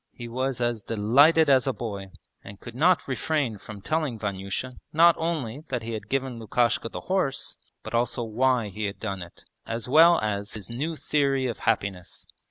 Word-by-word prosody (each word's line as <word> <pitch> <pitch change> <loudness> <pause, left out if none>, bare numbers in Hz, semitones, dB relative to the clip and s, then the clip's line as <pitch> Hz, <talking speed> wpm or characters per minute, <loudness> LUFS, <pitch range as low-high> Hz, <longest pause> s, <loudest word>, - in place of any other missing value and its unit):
He 120 - -8
was 130 +2 -2
as 120 -2 -1
delighted 140 +11 +4
as 135 -1 +4
a 135 - +1
boy, 100 -5 -5 0.4
and 100 0 -11
could 120 - -10
not 170 +8 +3
refrain 135 -4 -1
from 105 0 -10
telling 155 -1 -1
Vanyusha 100 +4 -4
not 170 +2 +6
only 155 -5 -2
that 125 -3 -2
he 115 - -5
had 110 - -6
given 130 -3 -2
Lukashka 115 0 0
the - - -6
horse, 185 -8 -1 0.3
but - - -8
also 120 +1 0
why 120 0 +1
he 105 +2 -4
had 100 +1 -4
done 100 -4 -4
it, 85 0 -11 0.2
as 115 +1 -3
well 165 +5 +7
as 105 0 -3
his 105 0 -7
new 150 +7 -3
theory 140 -3 +1
of 120 -3 -3
happiness. 95 -3 -2
120 Hz, 180 wpm, -26 LUFS, 110-140 Hz, 0.4 s, well